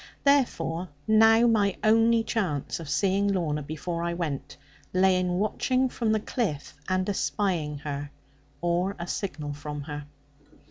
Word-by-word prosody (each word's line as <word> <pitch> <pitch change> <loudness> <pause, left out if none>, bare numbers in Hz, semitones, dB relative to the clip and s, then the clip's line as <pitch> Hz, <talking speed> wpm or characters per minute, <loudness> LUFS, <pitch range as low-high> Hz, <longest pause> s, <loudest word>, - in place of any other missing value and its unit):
Therefore 185 - +2 0.2
now 225 +1 +6
my 210 -4 +2
only 225 +1 +4
chance 180 - -2
of 160 -3 -8
seeing 195 +6 +2
Lorna, 165 -7 0
before 160 +4 -4
I 170 0 -1
went, 140 -5 -4 0.4
lay 185 0 +4
in 180 -1 0
watching 255 +7 +1
from 230 -3 -1
the 220 - +2
cliff 205 - -3 0.2
and 185 0 +1
espying 185 -7 -1
her, 145 -1 -4 0.5
or 175 +3 0
a 170 - -5
signal 155 -6 -4
from 150 0 -6
her. 145 0 -6
180 Hz, 140 wpm, -27 LUFS, 150-215 Hz, 0.5 s, now